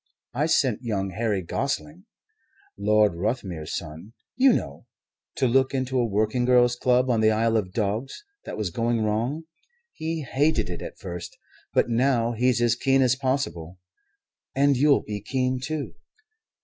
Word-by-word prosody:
I 145 +6 0
sent 130 -8 +2
young 100 -5 -2
Harry 105 -1 -1
Gostling 75 +1 -3 0.7
Lord 105 0 +3
Ruthmere's 90 -4 -3
son, 80 +8 -8 0.2
you 265 +1 +5
know 70 - -3 0.5
to - - +1
look 130 +2 +2
into 130 0 -1
a 120 - +1
working 110 +4 0
girls' 120 -1 +4
club 125 +1 +2
in 115 -2 +2
the 110 - +5
Isle 115 +1 +1
of 100 -4 0
Dogs 110 - -3 0.2
that - - -7
was 105 -5 -2
going 115 +3 0
wrong. 115 +9 -1 0.5
He 160 0 -3
hated 135 - 0
it 85 - -6
at - - -8
first, 90 -2 -7 0.3
but - - +2
now 120 0 +2
he's 120 +1 +1
as 120 -1 +3
keen 135 +2 +2
as 130 0 +3
possible. 130 - -2 0.8
And 140 +1 +4
you'll 140 +2 +3
be 105 -1 -5
keen 130 +4 -1
too." 150 +3 -4
120 Hz, 155 wpm, -25 LUFS, 105-130 Hz, 0.8 s, you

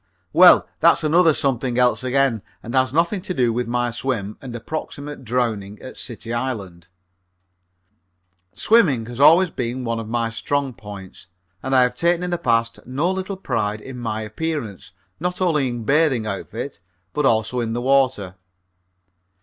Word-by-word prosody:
Well, - - +7
that's - - +4
another 165 +2 +5
something 130 -4 -1
else 125 0 +2
again 130 -3 +1 0.2
and 115 - -7
has 130 -2 +2
nothing 170 +6 +1
to 185 -1 -5
do 120 -3 +2
with 120 0 -2
my 120 0 0
swim 115 -4 -3
and 125 -3 -7
approximate 145 +3 -6
drowning 110 -4 -2
at 130 - -10
City 115 -1 -5
Island. 100 -9 -4 1.6
Swimming 160 - +3
has 120 +2 -8
always 165 +5 +6
been 125 +1 -3
one 115 -1 -2
of 110 -1 -7
my 115 -1 -1
strong 140 +3 -2
points, 100 -5 -11 0.3
and 130 0 -1
I 130 - +6
have 125 0 +1
taken 170 +6 +1
in 180 - -3
the 175 - -1
past 115 -5 +1
no 145 +8 0
little 190 +1 -4
pride 110 - -2
in 125 +3 -9
my 110 -2 -3
appearance, 115 - -5 0.3
not 180 +2 -2
only 155 -7 +2
in 120 -1 -4
a - - -7
bathing 140 -3 +2
outfit, 100 -2 -5 0.3
but 150 -2 +2
also 115 +2 +1
in 115 -1 -2
the 120 - -2
water. 130 -9 +1
125 Hz, 165 wpm, -21 LUFS, 115-145 Hz, 1.6 s, Well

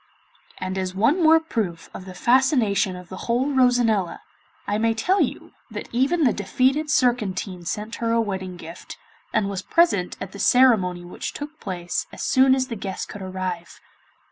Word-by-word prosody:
And 185 +1 -3
as 185 0 -3
one 270 - +2
more 320 0 +6
proof 210 - -3
of 185 - -8
the 185 -1 -10
fascination 235 -5 +2
of 180 -1 -11
the 185 - -8
whole 260 +5 +1
Rosanella, 245 -7 +2 0.4
I 205 +1 -1
may 225 0 +1
tell 365 - +2
you - - -3 0.2
that - - -6
even 275 +8 +1
the 245 -6 +4
defeated 260 +9 0
Surcantine 210 - 0
sent 215 +4 -4
her 230 -1 -1
a 230 - +3
wedding 190 -4 -3
gift, 165 +1 -10 0.3
and 215 -3 +1
was 195 -2 -3
present 200 - +2
at 190 - -6
the 200 - -10
ceremony 195 -10 +3
which 175 - -6
took 300 +2 -8
place 175 -3 -4
as - - -7
soon 260 0 +4
as 260 -1 0
the 235 - -5
guests 195 -2 -5
could 205 - -9
arrive. 185 -2 -5
215 Hz, 175 wpm, -23 LUFS, 185-260 Hz, 0.4 s, more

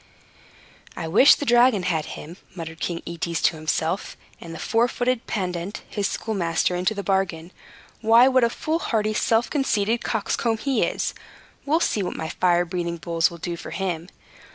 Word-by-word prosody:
"I 165 - -4
wish 210 - +7
the 290 - -5
dragon 240 -5 +4
had 165 -4 0
him," 165 +4 -10 0.2
muttered 165 -2 -7
King 170 -1 -3
Aetes 170 0 -3
to - - +3
himself, 160 +3 -2 0.2
"and 170 - -9
the 165 - -7
four 230 +6 +2
footed 245 -1 -1
pedant, 180 -1 -3
his 205 -2 -1
schoolmaster, 180 -5 -1
into 180 +5 0
the 200 - -4
bargain. 185 -4 -1 0.5
Why, 230 +3 +6
what 260 -2 +4
a 235 - +4
foolhardy, 230 -8 -1
self 225 +2 +2
conceited 230 -5 +1
coxcomb 225 +1 0
he 270 +3 0
is! - - -1 0.5
We'll 320 +4 +2
see 210 - +1
what 180 - -3
my 160 - -4
fire 175 0 +2
breathing 170 -1 -3
bulls 165 0 +1
will 170 - -10
do 170 +1 -4
for - - -9
him. 175 -3 -3
190 Hz, 170 wpm, -24 LUFS, 170-230 Hz, 0.5 s, wish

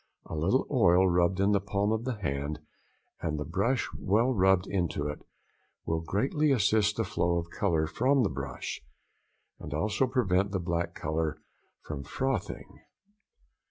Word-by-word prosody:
A - - -6
little 90 - +2
oil 95 -8 +5
rubbed 90 +1 +2
in 100 +1 +3
the 100 -1 +3
palm 100 +1 0
of 110 +1 -1
the 130 -2 -1
hand, 75 -6 -3 0.6
and 75 -1 -2
the 75 - -3
brush 100 - 0
well 115 +7 +2
rubbed 95 -3 +3
into 85 -7 -1
it, 75 - -5 0.6
will 80 0 -1
greatly 135 - +1
assist 105 -3 +3
the 115 - +1
flow 85 -3 0
of 85 0 -4
colour 80 -6 +1
from 130 - +2
the 100 - +1
brush, 65 -1 -5 0.8
and 75 - -6
also 105 - +1
prevent 100 -6 +1
the 95 - 0
black 85 0 -2
colour 80 0 -2 0.4
from 75 -2 -5
frothing. 135 - -3
95 Hz, 155 wpm, -29 LUFS, 80-110 Hz, 0.8 s, oil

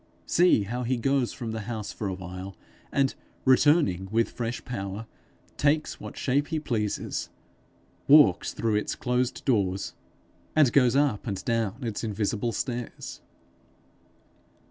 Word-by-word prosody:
See 175 - +4
how 120 +5 -3
he 125 +1 0
goes 135 +1 +1
from 120 -5 -5
the 110 - -3
house 110 -3 -4
for 105 - -4
a 95 - -2
while, 90 +1 -7 0.4
and 135 -1 +2 0.3
returning 130 - +4
with 115 +2 +1
fresh 120 0 -4
power, 100 -2 -5 0.5
takes 150 +2 +1
what - - -9
shape 140 +2 +1
he 160 -1 -1
pleases, 110 -8 -2 0.8
walks 140 - +6
through 110 -2 0
its 105 - -2
closed 125 0 -1
doors, 100 -6 +1 0.6
and 145 -6 +5
goes 125 -3 +4
up 140 -7 +1
and 100 -3 -4
down 115 +1 -1
its 115 -2 -3
invisible 110 +1 -1
stairs! 120 +1 -5
115 Hz, 135 wpm, -27 LUFS, 105-135 Hz, 0.8 s, walks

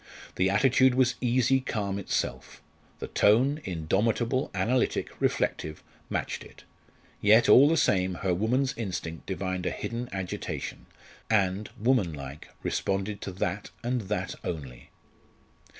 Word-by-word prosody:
The 95 +1 +2
attitude 130 +4 +4
was 130 -1 +3
easy 125 +1 +3
calm 100 -6 -2
itself. 100 - -3 0.4
The - - -5
tone 130 +9 +3
indomitable, 110 - 0
analytic, 125 +2 0
reflective 75 0 -1 0.3
matched - - -3
it. - - -15 0.6
Yet, 110 +3 +6
all 140 +3 +8
the 165 - +2
same, 95 - +2
her 90 +1 0
woman's 125 +8 +1
instinct 90 -7 -5
divined 95 0 -2
a - - +2
hidden 120 +1 -4
agitation, 95 -2 -5 0.4
and, 100 -1 +1
woman 110 -7 +2
like, 70 0 -8 0.2
responded 100 +1 -1
to 95 - -5
that 90 +2 -3
and 120 0 0
that 95 -2 -2
only. 70 -8 -6
105 Hz, 125 wpm, -28 LUFS, 90-125 Hz, 0.6 s, all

